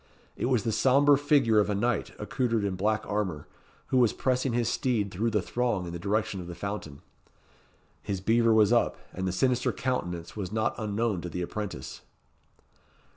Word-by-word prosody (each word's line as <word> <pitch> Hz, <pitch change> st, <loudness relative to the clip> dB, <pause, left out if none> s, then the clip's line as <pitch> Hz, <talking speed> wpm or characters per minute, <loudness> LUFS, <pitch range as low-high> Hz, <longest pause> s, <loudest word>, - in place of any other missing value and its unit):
It -, -, -2 dB
was 125 Hz, -5 st, +2 dB
the 115 Hz, -, 0 dB
sombre 140 Hz, +6 st, +5 dB
figure 140 Hz, -6 st, +3 dB
of 105 Hz, -, +2 dB
a 105 Hz, -, 0 dB
knight 115 Hz, +2 st, 0 dB
accoutred 115 Hz, -1 st, -1 dB
in 100 Hz, -2 st, -1 dB
black 110 Hz, +3 st, 0 dB
armour, 95 Hz, -8 st, -2 dB, 0.4 s
who 130 Hz, -, +3 dB
was 120 Hz, -3 st, +4 dB
pressing 130 Hz, 0 st, 0 dB
his 120 Hz, -1 st, +1 dB
steed 110 Hz, -6 st, 0 dB
through 110 Hz, +6 st, 0 dB
the 105 Hz, -4 st, 0 dB
throng 120 Hz, -7 st, -1 dB
in 85 Hz, -, -6 dB
the 85 Hz, -, -5 dB
direction 105 Hz, +1 st, -1 dB
of 85 Hz, -, -9 dB
the 85 Hz, -, -7 dB
fountain. 100 Hz, -9 st, -6 dB, 1.0 s
His 100 Hz, -2 st, -3 dB
beaver 115 Hz, +4 st, +3 dB
was 110 Hz, 0 st, +5 dB
up, 120 Hz, -, +2 dB, 0.2 s
and 95 Hz, 0 st, -3 dB
the -, -, 0 dB
sinister 125 Hz, +6 st, +1 dB
countenance 90 Hz, -10 st, -3 dB
was 100 Hz, -3 st, -4 dB
not 110 Hz, 0 st, 0 dB
unknown 105 Hz, -2 st, -1 dB
to 90 Hz, -, -5 dB
the 90 Hz, +1 st, -3 dB
apprentice. 105 Hz, +2 st, -6 dB
110 Hz, 180 wpm, -28 LUFS, 95-120 Hz, 1.0 s, sombre